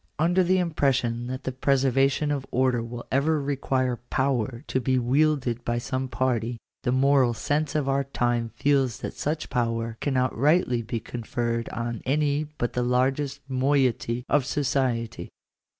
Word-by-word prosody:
Under 175 +4 +3
the 185 +2 +3
impression 135 -8 0
that 130 +1 -5
the 130 - -2
preservation 135 +2 +2
of 140 -2 -2
order 125 -1 +1
will. 120 +1 -6
J 130 - +3
ever 155 +2 +2
require 130 -3 -1
power 130 -2 0
to 130 - -1
be 130 +2 +1
wielded 130 -1 +1
by 120 0 -1
some 130 +2 -2
party, 120 -2 -1 0.2
the 125 - 0
moral 130 -2 +3
sense 145 +6 -1
of 150 -3 0
our 135 0 +1
time 120 -3 0
feels 135 -4 +2
that - - -4
such 155 +2 -3
power 115 -2 -1
cannot 130 -3 0
rightly 140 -2 +2
bo 115 +1 -3
conferred 115 0 -3
on 115 -1 -4
any 145 +2 +1
but 120 - -2
the 125 - 0
largest 135 +3 0
moiety 130 -3 +1
of 145 -2 +3
society. 130 -4 -1
130 Hz, 155 wpm, -26 LUFS, 120-140 Hz, 0.2 s, Under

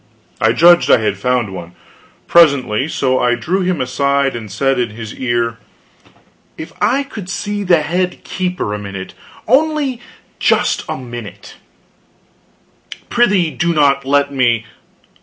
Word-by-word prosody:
I 110 - +4
judged 175 +6 +5
I - - +7
had 105 -3 -2
found 120 -3 0
one, 85 -2 -8 0.5
presently; 140 -7 +3
so 130 -4 0
I 120 0 +2
drew 175 +11 -1
him 180 -3 -1
aside 140 +1 0
and 110 -4 -7
said 135 -2 0
in 120 -2 0
his 110 0 -8
ear: 120 -2 -2 1.0
"If 160 - -8
I 275 +3 +2
could 210 -9 -9
see 205 +1 -3
the 175 -4 +3
head 180 +4 -2
keeper 180 - -3
a 105 - -4
minute 100 -2 -7 0.3
only 280 -1 +1 0.4
just - - +1
a - - -3
minute 120 -4 -9 0.7
" - - -19
"Prithee 205 -9 +2
do 165 +6 -1
not 140 -2 +3
let 140 +1 +1
me." 120 -4 +1
140 Hz, 140 wpm, -16 LUFS, 120-180 Hz, 1.0 s, I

